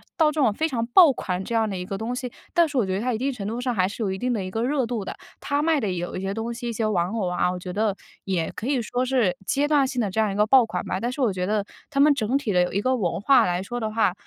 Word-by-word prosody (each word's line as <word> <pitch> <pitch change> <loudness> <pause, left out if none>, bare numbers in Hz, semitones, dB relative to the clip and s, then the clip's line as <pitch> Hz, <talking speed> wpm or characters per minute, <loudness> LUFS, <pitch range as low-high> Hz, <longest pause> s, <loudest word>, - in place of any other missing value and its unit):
到 320 - +4
这 305 - -4
种 240 -7 +3
非 315 +9 0
常 235 -5 -1
爆 300 +6 +7
款 185 -7 -3
这 230 - -4
样 225 -1 +2
的 195 - -4
一 180 - -4
个 195 - -4
东 225 +4 -3
西， 250 -1 -5 0.2
但 340 -3 +4
是 285 - -3
我 235 - +3
觉 190 - -2
得 195 - -2
它 250 +2 0
一 - - -1
定 270 +4 -1
程 205 -5 -5
度 230 +3 -3
上 250 0 -1
还 185 -4 +2
是 220 - -5
有 195 - -1
一 190 - -3
定 250 +3 -1
的 215 -5 -1
一 185 - -6
个 225 - -2
热 265 +1 +1
度 230 -3 -3
的。 - - -7 0.2
它 285 +1 -1
卖 320 -1 +2
的 210 -7 -1
有 175 -1 -4
一 185 - -4
些 195 +1 -3
东 225 +1 -3
西， 240 0 -5
一 - - -3
些 220 0 -1
玩 180 -5 +1
偶 220 -5 -1
啊， 180 0 +1
我 180 - -4
觉 180 0 -7
得 210 0 0 0.3
也 180 -4 -1
可 230 - -5
以 275 -2 +1
说 245 +2 -2
是 250 -8 +1
阶 285 +1 +1
段 290 -3 +3
性 260 -1 -3
的 210 -5 0
这 220 - +1
样 215 -2 +1
一 - - -4
个 210 +1 +3
爆 255 +3 +6
款 180 - -4
吧。 185 - -2
但 240 +4 -2
是 260 - -8
我 240 -7 +2
觉 180 0 -2
得 210 -1 0 0.2
它 275 - -2
们 295 +1 +6
整 250 0 0
体 255 -8 -2
的 180 - +4
有 180 - 0
一 195 - 0
个 255 +5 +1
文 190 -9 -1
化 265 +7 +5
来 180 0 0
说 240 +5 -4
的 220 -2 -2
话， 215 -4 +2
225 Hz, 365 characters per minute, -24 LUFS, 195-255 Hz, 0.3 s, 爆